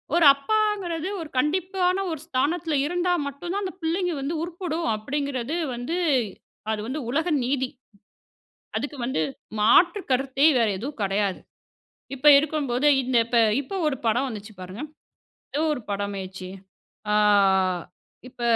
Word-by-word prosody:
ஒரு 345 - +5
அப்பாங்கிறது, 375 +1 -1
ஒரு 320 - -7
கண்டிப்பான 365 +5 +1
ஒரு 320 - -4
ஸ்தானத்துல 315 +3 0
இருந்தா 355 +3 0 0.2
மட்டும் 280 +5 -6
தான் 405 - -1
அந்தப் 375 -1 -6
பிள்ளைங்க 350 +2 0
வந்து 280 +4 -2
உருப்புடும் 340 -2 -3
அப்டிங்கறது 275 +4 -3 0.2
வந்து 245 +9 -3 0.7
அது 215 - -1
வந்து 275 +4 -3
உலக 320 +6 0 0.2
நீதி. 260 0 0 1.1
அதுக்கு 285 +5 -4
வந்து 245 -10 -1 0.4
மாற்றுக்கருத்தே 270 - +3
வேற 230 - +3
எதுவும் 265 +6 -6
கிடையாது. 195 -1 0 0.8
இப்ப 275 +3 +3
இருக்கும்போதே, 285 -3 +1
இந்த 255 0 0
இப்ப 235 0 +2 0.2
இப்ப 285 - -8
ஒரு 280 - -2
படம் 240 +5 +2
வந்துச்சு 215 -2 -8
பாருங்க. 185 +6 -7 0.7
ஏதோ 300 - +1
ஒரு 250 - -7
படம்மைச்சே. 195 -2 -4 0.6
ஆ. - - +4 1.1
இப்ப 245 - -14
280 Hz, 125 wpm, -25 LUFS, 240-340 Hz, 1.1 s, ஒரு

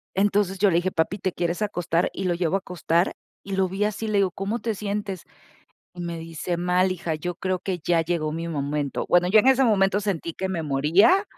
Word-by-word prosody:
entonces 200 0 +2
yo 200 0 +3
le 165 - +3
dije: 175 +2 +1
"Papi, 175 +5 -1
¿te 185 - -1
quieres 175 +2 -2
acostar?". 175 -4 0
Y 195 - -5
lo 180 -2 +1
llevo 175 +1 0
a - - +4
acostar 175 -1 0 0.3
y 195 -1 -4
lo 190 -1 +1
vi 195 +3 -1
así, 210 +1 -2
le 215 -1 +1
digo: 190 -2 +2
¿Cómo 195 +5 -3
te 230 -2 -2
sientes?". 200 -2 -4 0.7
Y 175 - -8
me 170 -1 -4
dice: 165 +1 -4
"Mal, 180 +1 +2
hija, 170 -3 -3
yo 175 +3 -4
creo 185 0 -2
que 185 -1 -3
ya 170 0 +2
llegó 160 -2 -1
mi 165 +2 -4
momento". 145 -2 -2
Bueno, 175 0 +4
yo 210 +4 +6
en 215 - +4
ese 265 0 +5
momento 200 -3 +3
sentí 175 -5 -3
que 190 - -3
me 170 -3 -2
moría. 160 - +4
180 Hz, 225 wpm, -24 LUFS, 170-200 Hz, 0.7 s, yo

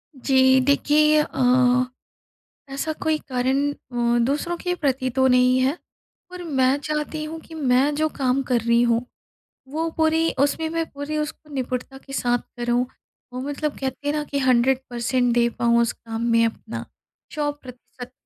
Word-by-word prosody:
जी। 260 0 +4
देखिए 300 +2 +4
अ, 300 -3 -1 1.3
ऐसा 280 +3 -3
कोई 315 -1 +2
कारण 265 +3 +1
अ, 240 -3 -1
दूसरों 300 +6 -1
के 360 +1 -2
प्रति 265 -5 -1
तो 260 +1 +2
नहीं 250 0 +4
है। 265 +5 +1 0.5
पर 360 0 -8
मैं 265 -4 +2
चाहती 305 +1 -3
हूँ 320 +1 -6
कि 320 - -15
मैं 275 -1 +2
जो 310 +1 +1
काम 265 -2 0
कर 250 -3 0
रही 235 +1 +3
हूँ, 235 0 +1 0.6
वो 320 +4 -2
पूरी 320 +1 +2
उसमें 285 +4 +1
मैं 330 0 -1
पूरी 285 +2 -5
उसको 305 0 -5
निपुणता 255 0 -4
के 275 - -13
साथ 245 -2 +1 0.2
करूँ। 240 +1 +1 0.5
वो 250 - -5
मतलब 290 +2 -3
कहते 265 +1 -4
हैं - - +2
ना 300 - -1
कि 285 -1 -3
100% 250 -1 +1
दे 235 0 +3
पाऊँ 235 0 +3
उस 235 - 0
काम 225 0 -7
में 230 0 +4
अपना 225 - -6 0.5
100% 255 -4 -6
265 Hz, 160 wpm, -23 LUFS, 250-300 Hz, 1.3 s, जी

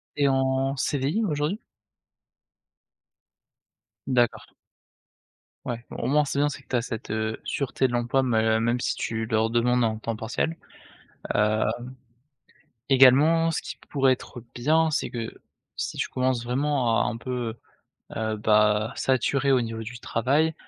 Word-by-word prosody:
Tu 145 - 0
es - - +5
en 135 0 +1
CDI, 145 +10 0
aujourd'hui? 155 +3 -1 2.5
D'accord. 120 -3 0 1.1
Ouais, 120 -1 -4
au - - -4
moins, 150 +2 +3
c'est 140 -1 -2
bien, 145 - +3
c'est 145 -1 -6
que - - -35
tu - - -1
as - - +1
cette, 115 -3 -6
heu, 110 0 -2
sûreté 135 -1 -1
de - - -6
l'emploi, 120 +2 +1
mê 110 -3 +2
même 120 +2 +1
si - - -1
tu 115 0 -3
leur 110 0 +1
demandes 120 +1 +2
un 110 -1 0
temps 115 +1 -4
partiel, 120 +9 -2 0.8
hem, 105 +1 +2 1.3
également, 140 +5 +6
ce 165 - -2
qui - - -7
pourrait 135 -2 +3
être 125 -1 -9
bien, 155 +6 +2
c'est 155 - -1
que, 115 -2 -6 0.3
si - - -4
tu - - -1
commences 130 -2 0
vraiment 125 -1 +1
à - - -2
un 115 - -5
peu, 120 -2 -4 0.6
heu, 110 -1 -1
bah, 105 +1 +3
saturer, 135 +2 +1
au 130 - +4
niveau 115 -1 -4
du 120 +2 -8
travail, 140 +9 +1
125 Hz, 150 wpm, -25 LUFS, 115-140 Hz, 2.5 s, également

